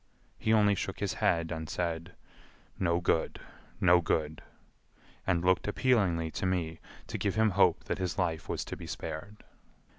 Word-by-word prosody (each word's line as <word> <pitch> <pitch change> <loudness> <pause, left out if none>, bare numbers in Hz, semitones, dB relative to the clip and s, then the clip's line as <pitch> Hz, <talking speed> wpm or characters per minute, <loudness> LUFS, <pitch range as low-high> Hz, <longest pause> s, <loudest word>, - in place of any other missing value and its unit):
He 110 - +1
only 105 -2 +5
shook 95 - -3
his - - -1
head 85 -1 +1
and 80 -1 -4
said, 85 0 -3 0.6
"No 85 -2 +2
good. 85 -2 0 0.4
No 90 -1 +5
good," 80 -2 -1 0.9
and 90 -2 +1
looked 95 +2 +3
appealingly 100 -9 +2
to 95 - -2
me 85 -3 -1 0.3
to - - -5
give 100 - 0
him 110 -1 +3
hope 95 -3 +3
that - - -3
his 90 +1 -2
life 85 -4 -1
was - - -2
to - - -5
be - - -9
spared. 80 +7 -6
90 Hz, 160 wpm, -30 LUFS, 80-100 Hz, 0.9 s, only